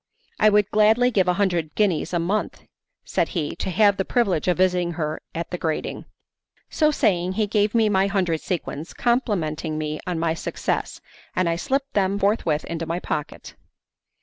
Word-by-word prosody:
"I 215 - +6
would 210 0 +2
gladly 220 +4 +4
give 190 -5 +2
a 180 - +3
hundred 175 -6 0
guineas 190 -8 +1
a 175 - 0
month," 185 +6 -2 0.4
said - - 0
he, 150 -3 -2
"to - - -3
have 200 +1 +4
the 190 - +1
privilege 195 - 0
of 180 - +2
visiting 180 -2 +2
her 155 -2 -3
at 170 0 -4
the 180 - -3
grating." 160 -2 -3 0.7
So 305 -2 +3
saying 185 - +1
he 215 +2 +1
gave 210 +1 +1
me 225 -2 +4
my 195 -1 +2
hundred 180 -5 0
sequins, 165 -3 -4
complimenting 170 - 0
me 155 0 -3
on 180 -2 -1
my 160 0 +1
success, 165 - -3 0.3
and 185 - +1
I 165 - +1
slipped 275 +9 -2
them 200 0 +1
forthwith 200 -7 +1
into 165 -1 -4
my 170 +2 -2
pocket. 150 -4 -5
185 Hz, 175 wpm, -23 LUFS, 165-210 Hz, 0.7 s, I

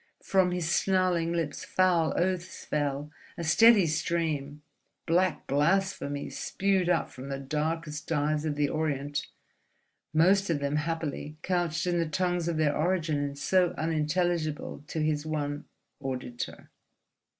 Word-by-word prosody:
From 190 -2 +3
his 180 -2 -2
snarling 180 -2 +2
lips 165 -3 -2
foul 180 -3 +2
oaths 185 0 -2
fell, 145 0 -2 0.3
a 170 - -4
steady 210 +4 +6
stream, 155 -2 -1 0.4
black 175 +1 +1
blasphemies 150 0 0
spewed 195 -2 +1
up 175 - +1
from 130 +1 -9
the 135 - -2
darkest 150 +2 -3
dives 150 -1 0
of 155 -2 -1
the 145 0 +2
Orient—most 155 +5 -1
of 165 - +2
them 140 +1 0
happily 155 -1 -3
couched 175 -3 0
in 175 -1 +1
the 165 -2 0
tongues 175 -1 0
of 170 -2 -1
their 150 -2 +2
origin 165 -2 +1
and 140 -1 -3
so 180 +3 +2
unintelligible 160 -1 -1
to 155 - -2
his 150 -1 0
one 145 -2 -3 0.3
auditor. 130 -3 -5
160 Hz, 130 wpm, -29 LUFS, 150-175 Hz, 0.4 s, steady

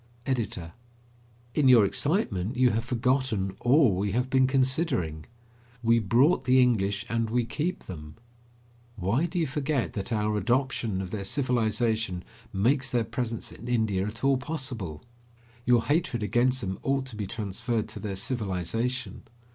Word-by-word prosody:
EDITOR: 105 - -2 0.8
In 145 -3 +3
your 120 -5 +7
excitement, 120 - 0
you 125 -1 +4
have 115 +2 -1
forgotten 120 -5 0
all 130 -3 +4
we 100 +1 -1
have 125 +2 0
been 130 -1 +4
considering. 130 - 0 0.6
We 115 0 +4
brought 125 - +3
the 130 +1 +5
English, 100 -5 +2
and 115 -1 -1
we 120 +1 +1
keep 165 +9 -3
them. 75 -3 -9 0.8
Why 110 - 0
do 175 +2 -5
you 165 - +2
forget 140 -1 -1
that 100 +2 -5
our 105 -1 0
adoption 115 -3 0
of 90 - -7
their 100 -2 -3
civilization 110 -5 0 0.3
makes 130 +7 +1
their 120 -2 +1
presence 115 0 -4
in 120 - -10
India 110 -5 +1
at 115 +4 -7
all 135 -1 +4
possible? 125 - -5 0.6
Your 120 -2 +5
hatred 145 -7 0
against 125 +4 +2
them 95 -3 -4
ought 135 0 0
to 130 -4 -9
be 105 -2 -4
transferred 110 +2 -2
to - - -7
their 100 -3 -4
civilization. 115 +2 -2
115 Hz, 150 wpm, -27 LUFS, 100-130 Hz, 0.8 s, your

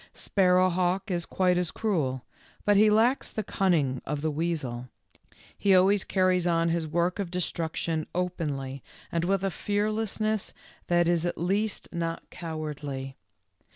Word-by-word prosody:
Sparrowhawk 185 +1 +2
is 170 -2 -1
quite 180 -1 +2
as 180 -2 -1
cruel, 150 - -1 0.4
but 205 - +4
he 215 +2 +6
lacks 230 +5 +3
the 215 - -3
cunning 155 -11 +1
of 145 0 -3
the 155 0 0
weasel; 145 -6 -3 0.7
he 195 -2 +3
always 190 +2 +5
carries 185 -2 +2
on 165 -1 +2
his 165 -1 -1
work 170 +4 0
of 195 -4 -2
destruction 165 -2 -2
openly 145 -7 -3 0.3
and 170 0 0
with 195 +2 +1
a 195 - 0
fearlessness 215 +1 -1 0.3
that 175 -1 +3
is 170 -1 +2
at - - -3
least 200 +5 -1
not 165 -1 -3
cowardly. 150 -5 -5
175 Hz, 140 wpm, -27 LUFS, 160-195 Hz, 0.7 s, he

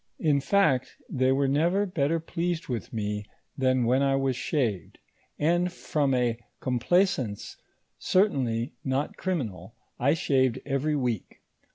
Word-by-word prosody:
In 150 -4 +2
fact, 140 -5 +2
they 130 0 +2
were 135 +1 +2
never 170 +9 +2
bet 160 -7 0
ter 165 +2 +1
pleased 165 +1 -3
with 120 -3 -4
mo, 105 -1 -2 0.3
than 130 -2 +2
when 130 +3 +3
I 135 -1 +3
was 135 -1 0
shaved; 115 - -2 0.4
and 175 +4 +2
from 145 -6 0
a 120 -2 +1 0.2
complaisance 130 - 0 0.4
certainly 130 - +1
not 135 +2 -1
criminal, 115 - -4 0.2
I 140 +5 +3
shaved 130 -6 +2
every 145 +2 0
week. 125 -7 -3
135 Hz, 135 wpm, -27 LUFS, 125-160 Hz, 0.4 s, when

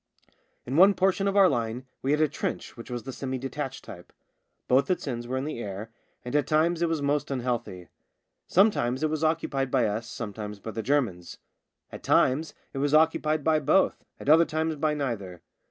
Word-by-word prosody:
In 130 +4 -2
one 195 +3 +7
portion 195 +1 +1
of 200 0 0
our 195 -1 +7
line 120 -3 -2 0.2
we 135 - -2
had 150 +2 +2
a 155 - +4
trench - - -4
which 115 0 -10
was 120 -1 -4
of - - -25
the 135 - -6
semi 130 0 -4
detached 135 +1 -5
type. 90 -2 -11 0.6
Both 130 +2 +3
its 180 -4 -1
ends 120 -2 -4
were 130 +1 -2
in 130 - -2
the 150 -5 -4
air, 105 0 -6 0.3
and 125 - -4
at 150 - +2
times 160 +2 +2
it 170 - +2
was 160 -3 -1
most 145 +1 0
unhealthy. 120 - -3 0.6
Sometimes 155 - +2
it 155 - +1
was 155 0 -2
occupied 150 -4 0
by 125 -1 +2
us, 110 +2 -2
sometimes 105 -3 -6
by 110 - -6
the 110 - -4
Germans; 110 -10 -1 0.5
at - - -9
times 150 +5 +2 0.2
it 135 - -4
was 145 +2 +2
occupied 155 -1 +2
by 155 0 +3
both, 155 +6 +2 0.2
at - - -10
other 160 +3 +7
times 160 0 -1
by 150 +1 0
neither. 100 - -4
135 Hz, 200 wpm, -27 LUFS, 120-155 Hz, 0.6 s, one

